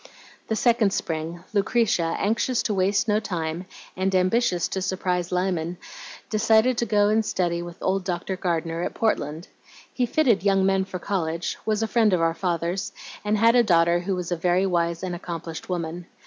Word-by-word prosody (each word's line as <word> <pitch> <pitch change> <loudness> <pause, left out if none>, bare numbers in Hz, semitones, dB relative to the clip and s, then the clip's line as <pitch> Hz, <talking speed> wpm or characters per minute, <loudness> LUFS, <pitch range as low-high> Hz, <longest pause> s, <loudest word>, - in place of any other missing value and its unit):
"The 220 - 0
second 225 -4 +3
spring, 165 +2 -3
Lucretia, 200 -5 +1
anxious 230 +4 0
to 215 - -1
waste 195 +2 +1
no 210 0 +3
time, 175 -3 -4 0.3
and 190 +1 0
ambitious 185 -1 +2
to 190 - -3
surprise 180 -2 -1
Lyman, 180 -2 -1 0.5
decided 220 +3 +3
to 235 - 0
go 205 -1 +3
and 220 +1 +3
study 175 -4 -1
with 175 -1 -8
old 190 0 +1
Dr. 180 +1 -3
Gardener 165 -2 -2
at - - -3
Portland. 160 -7 -1 0.5
He 250 -2 0
fitted 245 -5 +2
young 195 -1 +3
men 195 0 +2
for 190 -1 -6
college, 170 -3 -2
was 215 0 +1
a - - 0
friend 220 -3 +3
of 180 - +3
our 165 0 +2
father's, 170 +2 -2 0.3
and 210 +1 +1
had 230 +2 +5
a 245 - +7
daughter 170 -5 +3
who 185 +2 -2
was 180 -1 -4
a - - +2
very 180 +3 +1
wise 170 -2 0
and 185 -1 -3
accomplished 170 -1 -6
woman. 175 0 -4
185 Hz, 180 wpm, -24 LUFS, 170-210 Hz, 0.5 s, a